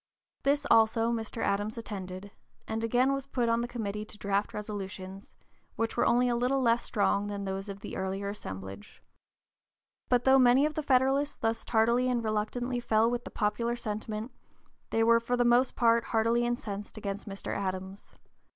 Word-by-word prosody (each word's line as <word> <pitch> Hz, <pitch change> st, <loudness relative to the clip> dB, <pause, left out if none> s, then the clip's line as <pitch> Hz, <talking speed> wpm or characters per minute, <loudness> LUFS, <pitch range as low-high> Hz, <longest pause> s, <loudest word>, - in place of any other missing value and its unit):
This 285 Hz, +1 st, +1 dB
also 225 Hz, +1 st, +4 dB
(p. 235 Hz, -, 0 dB
052) 225 Hz, +1 st, -6 dB
Mr. -, -, -1 dB
Adams 205 Hz, +3 st, -1 dB
attended, 195 Hz, -3 st, -6 dB, 0.4 s
and 225 Hz, +1 st, -3 dB
again 250 Hz, +4 st, +2 dB
was 275 Hz, 0 st, -4 dB
put 245 Hz, -3 st, 0 dB
on 230 Hz, 0 st, +2 dB
the 240 Hz, -, -2 dB
committee 210 Hz, -3 st, -4 dB
to 215 Hz, -, -13 dB
draft 200 Hz, 0 st, -1 dB
resolutions, 195 Hz, -2 st, -7 dB, 0.4 s
which 225 Hz, 0 st, -2 dB
were -, -, +2 dB
only 245 Hz, +1 st, +3 dB
a 240 Hz, -, +1 dB
little 250 Hz, +3 st, +1 dB
less 235 Hz, -2 st, +3 dB
strong 205 Hz, -1 st, +1 dB
than 200 Hz, -1 st, -4 dB
those 195 Hz, +1 st, -4 dB
of 200 Hz, 0 st, -7 dB
the -, -, -7 dB
earlier 190 Hz, +1 st, -3 dB
assemblage. 95 Hz, -, -8 dB, 1.1 s
But 245 Hz, -1 st, +3 dB
though 265 Hz, +1 st, +6 dB
many 255 Hz, +3 st, +5 dB
of 305 Hz, -, -1 dB
the 310 Hz, -, -2 dB
Federalists 275 Hz, +1 st, +2 dB
thus 225 Hz, 0 st, -1 dB
tardily 235 Hz, +3 st, +2 dB
and 240 Hz, -2 st, 0 dB
reluctantly 235 Hz, +3 st, -1 dB
fell 220 Hz, -2 st, +2 dB
in 235 Hz, -, +2 dB
with 245 Hz, 0 st, -3 dB
the -, -, -6 dB
popular 230 Hz, +2 st, -1 dB
sentiment, 215 Hz, +1 st, -4 dB, 0.6 s
they 225 Hz, -, +2 dB
were 230 Hz, 0 st, +5 dB
for 245 Hz, +2 st, -1 dB
the 245 Hz, -, +2 dB
most 245 Hz, +2 st, +3 dB
part 230 Hz, -1 st, +3 dB
heartily 230 Hz, +1 st, +1 dB
incensed 215 Hz, -5 st, -4 dB
against 200 Hz, 0 st, -5 dB
Mr. 195 Hz, 0 st, -5 dB
Adams. 190 Hz, 0 st, -5 dB
225 Hz, 185 wpm, -29 LUFS, 205-245 Hz, 1.1 s, though